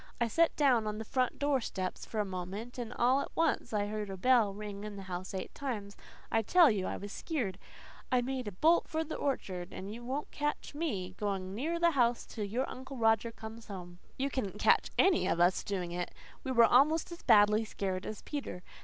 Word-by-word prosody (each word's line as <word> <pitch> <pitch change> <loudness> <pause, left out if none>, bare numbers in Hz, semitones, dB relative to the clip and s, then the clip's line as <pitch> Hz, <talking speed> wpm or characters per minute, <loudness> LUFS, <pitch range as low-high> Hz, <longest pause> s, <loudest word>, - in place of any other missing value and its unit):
I 235 - +2
set 330 +9 +3
down 250 -7 +3
on 210 0 -2
the 220 - -5
front 255 +2 0
door 285 -2 +1
steps 185 -4 -4
for 220 - -3
a 210 - +1
moment, 195 +6 -6
and 235 -1 -4
all 250 +3 +3
at - - -5
once 330 -7 +1
I 210 -2 +1
heard 210 0 -4
a 190 - -5
bell 235 0 +4
ring 205 0 -7
in 210 -1 -6
the 195 - -7
house 185 0 -5
eight 185 - -5
times. 220 -7 -4 0.4
I 225 - +3
tell 335 - +6
you 195 -3 -1
I - - -3
was 205 0 -7
skeered. 220 - -3 0.5
I 250 -1 +4
made 255 -2 -3
a - - -3
bolt 315 - +3
for 320 0 -1
the 320 - -6
orchard 185 -10 -3
and 195 +2 -6
you 240 +2 -8
won't 270 +5 -3
catch 295 0 -3
me 210 - -3
going 195 -2 -2
near 320 +10 -2
that 340 -1 +4
house 240 -3 +2
till 215 -3 -5
your 235 +6 -1
Uncle 265 +1 -8
Roger 225 0 +3
comes 225 0 -10
home." 175 -3 -8 0.2
You 275 +1 -1
wouldn't 210 -7 -2
catch - - +4
any 375 -2 +4
of - - +1
us 175 +2 +3
doing 185 -4 -3
it. 175 0 -3 0.3
We 265 - -2
were 235 -2 +7
almost 305 +8 +4
as 340 - -8
badly 210 -1 +5
scared 190 -3 -3
as 215 - -6
Peter. 265 - -5
225 Hz, 220 wpm, -32 LUFS, 195-265 Hz, 0.5 s, were